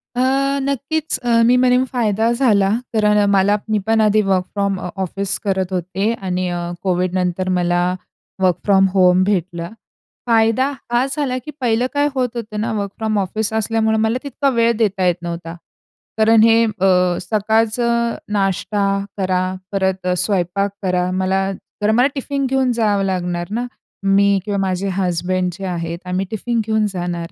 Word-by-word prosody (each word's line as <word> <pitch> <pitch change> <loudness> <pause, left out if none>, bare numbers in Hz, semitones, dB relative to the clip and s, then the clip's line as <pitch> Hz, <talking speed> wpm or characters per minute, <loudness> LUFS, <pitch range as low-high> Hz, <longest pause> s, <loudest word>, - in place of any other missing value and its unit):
अ, 250 - +1 0.4
नक्कीच 280 +3 -1
अ, 235 -1 +2
मी 245 +2 +5
म्हणेन 250 0 +3
फायदा 225 -2 +1
झाला. 220 -6 +3 0.2
तर 210 -1 +3
मला 200 +2 +3
मी 215 -1 +2
पण 225 0 +3
आधी 215 0 +4
वर्क 190 -2 +1
फ्रॉम 200 -2 -1 0.2
ऑफिस 195 +1 -2
करत 190 -2 -1
होते 185 +4 -1
आणि 185 -1 -2
अ, 175 0 -3
कोविडनंतर 185 0 0
मला 175 0 +1 0.6
वर्क 185 -2 +3
फ्रॉम 195 -1 +4
होम 185 -1 +4
भेटलं. 175 -3 -2 0.6
फायदा 230 +3 +3 0.2
हा 240 +2 +2
झाला 280 -3 -1
की 300 - -6
पहिलं 240 0 +1
काय 290 0 +2
होत 250 -2 -1
होतं 215 -2 -5
ना 230 +2 -1
वर्क 200 -1 -3
फ्रॉम 220 -1 -1
ऑफिस 205 +3 -2
असल्यामुळं 220 0 +1
मला 220 +2 +1
तितका 280 0 -1
वेळ 235 -2 +2
देता 200 -4 +1
येत 175 -1 +3
नव्हता. 170 -1 -6 0.6
कारण 220 0 +5
हे 230 0 +5
अ, 185 -4 +2
सकाळचं 225 +4 +1 0.2
नाष्टा 200 +1 0 0.3
करा, 185 -2 0 0.3
परत 190 -2 -1
अ, 180 - +2
स्वयंपाक 195 +1 0
करा. 180 -1 0
मला 190 +1 0 0.3
तर 210 +1 +2
मला 250 +2 +5
टिफिन 275 0 -2
घेऊन 265 -1 +1
जावं 210 -4 +1
लागणार 175 -2 -2
ना. 235 +3 -2 0.4
मी 200 0 +3
किंवा 205 -1 -2
माझे 190 0 -1
हसबंड 180 0 -1
जे 195 +2 -7
आहेत 170 -1 -4
आम्ही 185 +2 -1
टिफिन 230 +2 -2
घेऊन 220 -1 +1
जाणार. 175 -2 -4
200 Hz, 160 wpm, -19 LUFS, 185-225 Hz, 0.6 s, मी